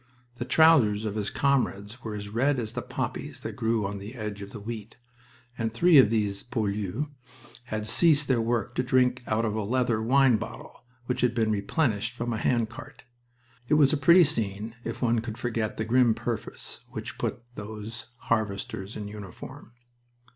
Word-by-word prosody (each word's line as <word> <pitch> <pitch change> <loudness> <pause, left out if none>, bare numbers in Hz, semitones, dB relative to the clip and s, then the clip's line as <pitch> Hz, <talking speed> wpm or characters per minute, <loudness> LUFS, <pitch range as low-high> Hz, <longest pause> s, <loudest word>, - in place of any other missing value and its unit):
The 120 - -2
trousers 125 -10 +5
of 105 - -2
his 105 -1 -2
comrades 120 -5 0
were 110 -2 -4
as 100 0 -6
red 130 +6 +1
as 110 -3 -3
the - - -3
poppies - - -4
that - - -4
grew 110 -2 0
on 100 0 -4
the 105 +6 -8
edge 105 -3 -5
of 100 - -7
the 110 - -7
wheat, 110 +1 -7 0.6
and 115 -1 0
three 160 +6 +6
of 125 - +7
these 105 -3 0
poilus 105 +1 -2 0.6
had 110 -3 -3
ceased 150 +5 +3
their 125 -3 +2
work 120 +1 -1
to - - 0
drink 125 0 +2
out 110 +1 +1
of 110 - -1
a 110 - -1
leather 120 +1 +1
wine 130 +1 +4
bottle 110 +2 -9 0.2
which 125 - -1
had 120 -1 +2
been 110 -2 +2
replenished 110 +1 0
from 120 -1 -2
a - - -1
hand 120 -1 +1
cart. 115 - -11 0.6
It 150 - +3
was 150 -1 +5
a - - +4
pretty 170 +5 +7
scene 110 -5 -2
if - - -4
one 120 -1 +3
could 110 -1 -5
forget 115 -3 -2
the 110 - -1
grim 120 0 +4
purpose - - -5
which - - -5
had - - -20
put - - -3
those 110 +1 -7
harvesters 100 -2 -2
in 105 -1 -5
uniform. 105 +2 -10
115 Hz, 185 wpm, -27 LUFS, 105-125 Hz, 0.6 s, of